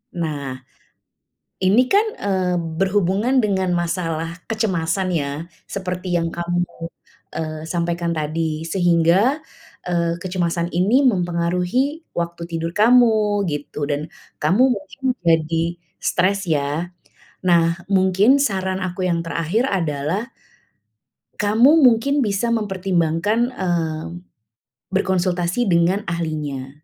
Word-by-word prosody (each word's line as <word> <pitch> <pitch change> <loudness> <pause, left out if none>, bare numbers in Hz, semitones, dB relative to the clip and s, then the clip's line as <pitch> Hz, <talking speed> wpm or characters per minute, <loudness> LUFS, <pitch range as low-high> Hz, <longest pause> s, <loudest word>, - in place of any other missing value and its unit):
Nah, 145 -6 -3 1.0
ini 195 +6 +4
kan 415 +3 +5
eee, 185 -3 0 0.2
berhubungan 200 +6 +1
dengan 190 -3 0
masalah 170 -1 -2
kecemasan 190 -4 0
ya, 145 -5 -1 0.4
seperti 180 -2 -3
yang 165 -1 0
kamu 175 +1 -1 0.7
eee, 155 -1 -4
sampaikan 170 0 -1
tadi, 155 0 -2
sehingga, 175 - +2 0.5
eee, 170 -1 0
kecemasan 175 -2 -1
ini 205 +11 +3
mempengaruhi 180 - 0
waktu 170 0 -3
tidur 165 0 -3
kamu, 215 -3 +4
gitu, 145 0 -5
dan 145 +2 -2 0.3
kamu 185 +11 +3
mungkin 200 +7 -14 0.2
jadi 165 0 +2 0.4
stres, 195 +1 0
ya. 150 +3 -1 0.5
Nah, 170 -1 +3
mungkin, 195 +7 +4
saran 190 -4 -1
aku 185 0 -3
yang 170 -1 +1
terakhir 165 +9 0
adalah, 175 - -2 1.1
kamu 230 +9 +5
mungkin 270 +5 +3
bisa 205 +3 0
mempertimbangkan 195 +2 0
eee, 165 -6 -1 0.9
berkonsultasi 185 +2 0
dengan 175 +4 +2
ahlinya. 150 -5 -3
180 Hz, 100 wpm, -21 LUFS, 165-200 Hz, 1.1 s, kan